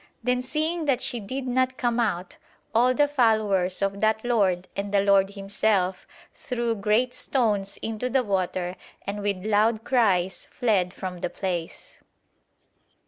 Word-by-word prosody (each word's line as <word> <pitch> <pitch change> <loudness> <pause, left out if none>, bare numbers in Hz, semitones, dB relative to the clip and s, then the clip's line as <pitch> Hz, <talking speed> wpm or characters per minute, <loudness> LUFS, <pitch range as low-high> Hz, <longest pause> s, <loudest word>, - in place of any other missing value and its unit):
Then 250 +1 +1
seeing 310 +5 -1
that 275 -4 +2
she 240 - -1
did 255 +6 -5
not 255 0 0
come 240 -1 0
out, 190 -6 -1 0.4
all 250 +3 +4
the 290 +1 +4
followers 215 -9 +2
of 195 0 -1
that 220 +1 +1
lord 190 -7 +1
and 200 0 -3
the 200 -1 +3
lord 200 0 +3
himself 195 -2 0 0.3
threw 240 -3 -2
great 220 +4 +1
stones 210 -7 0
into 225 +3 -2
the 260 +1 +2
water 185 -3 -2 0.3
and 205 +1 -4
with 200 -2 -2
loud 220 +1 +2
cries 195 -8 +1
fled 205 -8 +1
from 185 -1 -6
the - - -2
place." 175 -4 -5
215 Hz, 145 wpm, -25 LUFS, 195-245 Hz, 0.4 s, all